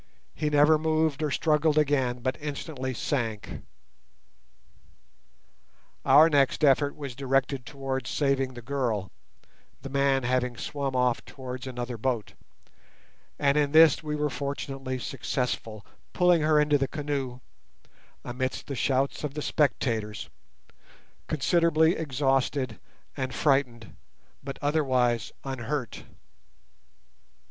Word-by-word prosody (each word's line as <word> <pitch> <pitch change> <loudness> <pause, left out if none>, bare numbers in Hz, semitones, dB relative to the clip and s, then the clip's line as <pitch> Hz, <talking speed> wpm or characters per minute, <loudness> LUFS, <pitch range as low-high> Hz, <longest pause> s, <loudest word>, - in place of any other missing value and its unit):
He 150 -1 -1
never 150 +1 +5
moved 155 -2 +1
or 155 - 0
struggled 155 +1 +2
again, 135 -5 +1
but 130 +1 -1
instantly 145 -2 -4
sank. 115 -5 -3 2.4
Our 145 +4 +7
next 145 -2 +2
effort 145 0 +4
was 140 -4 -6
directed 135 0 -1
towards 135 -2 -4
saving 135 -3 0
the 120 - -9
girl, 115 -7 -2 0.7
the 135 - -7
man 140 -1 +2
having 125 -1 0
swum 140 0 -3
off 125 -1 +1
towards 130 -1 -8
another 120 -2 -5
boat; 120 -3 -2 1.0
and 140 +1 +2
in 145 0 0
this 160 -2 +7
we 150 -1 -3
were 150 -1 -1
fortunately 135 -2 -4
successful, 120 -4 -3 0.3
pulling 180 -2 +4
her 155 0 +4
into 150 -1 +3
the 135 - 0
canoe 140 -4 -3 0.9
(amidst 130 +1 -3
the 140 - -5
shouts 135 +3 0
of 145 -1 -4
the 150 - -3
spectators) 115 -8 -1 1.0
considerably 160 +2 +3
exhausted 135 -4 0 0.4
and 130 -2 -3
frightened, 130 -6 0 0.5
but 135 0 -6
otherwise 130 -6 +1
unhurt. 130 -2 -4
135 Hz, 110 wpm, -27 LUFS, 125-150 Hz, 2.4 s, Our